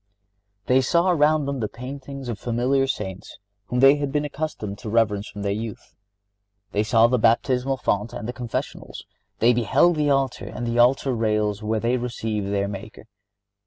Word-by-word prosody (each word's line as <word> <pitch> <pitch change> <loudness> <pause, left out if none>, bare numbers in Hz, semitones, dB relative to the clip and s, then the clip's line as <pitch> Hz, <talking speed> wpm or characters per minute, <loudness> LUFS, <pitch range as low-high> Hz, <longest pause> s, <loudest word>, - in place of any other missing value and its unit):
(69) - - -47
They 130 - +6
saw 170 +7 +2
around 155 -2 +3
them 140 -1 -3
the 110 - -1
paintings 135 +3 -8
of 115 -3 -4
familiar 125 +3 +1
Saints 95 -7 -5 0.3
whom 125 +3 -1
they 135 +2 +7
had 145 -1 -2
been 150 +1 0
accustomed 145 -9 -5
to 110 - -6
reverence 105 -2 +1
from 100 - -7
their 100 - 0
youth. 110 +1 -6 0.8
They 105 - +1
saw 115 +1 +4
the 125 +1 +2
baptismal 125 +4 +2
font 105 -2 -1
and 110 - -6
the 125 - -4
confessionals. 120 -2 -5 0.3
They 120 +2 +4
beheld 120 - +3
the 150 -1 +1
altar 135 -2 0
and 120 - -5
the 120 0 -1
altar 130 +2 +3
rails 105 -2 0
where 110 +1 -1
they 120 +3 +1
received 110 -4 -3
their 100 0 0
Maker. 100 +1 -8
120 Hz, 180 wpm, -23 LUFS, 105-135 Hz, 0.8 s, they